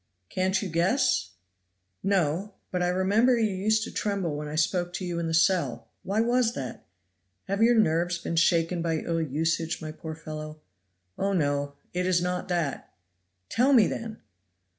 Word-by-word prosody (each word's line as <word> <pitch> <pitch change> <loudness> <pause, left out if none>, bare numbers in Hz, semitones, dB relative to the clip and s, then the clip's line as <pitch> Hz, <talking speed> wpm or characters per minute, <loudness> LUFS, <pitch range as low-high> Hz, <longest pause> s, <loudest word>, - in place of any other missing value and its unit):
"Can't 190 +2 0
you - - -2
guess?" 245 - +1 0.7
"No! 190 +1 0 0.2
But 180 - -1
I 180 - +2
remember 200 +7 +3
you 220 -3 +1
used 215 +3 +1
to - - -6
tremble 195 -7 -1
when 150 0 -4
I 150 - -5
spoke 175 +2 0
to 185 - -4
you 175 -1 -2
in 170 - -2
the 165 - -2
cell. 175 +2 +1
Why 205 +3 0
was 240 0 +2
that? 130 -2 -6 0.6
Have 195 +2 -2
your 235 +1 +5
nerves 175 -3 +2
been 170 - -4
shaken 170 +1 +2
by 165 -1 0
ill 165 +1 -1
usage, 160 +2 -1
my 155 -1 -6
poor 160 0 -7
fellow?" 155 -1 -7 0.6
"Oh, 200 0 +1
no! 145 -4 0 0.2
it 180 0 0
is 180 -1 +3
not 180 +1 -2
that." 170 -7 -2 0.6
"Tell 255 +5 +3
me, 230 -6 +7
then!" 225 +2 -4
180 Hz, 170 wpm, -27 LUFS, 165-200 Hz, 0.7 s, me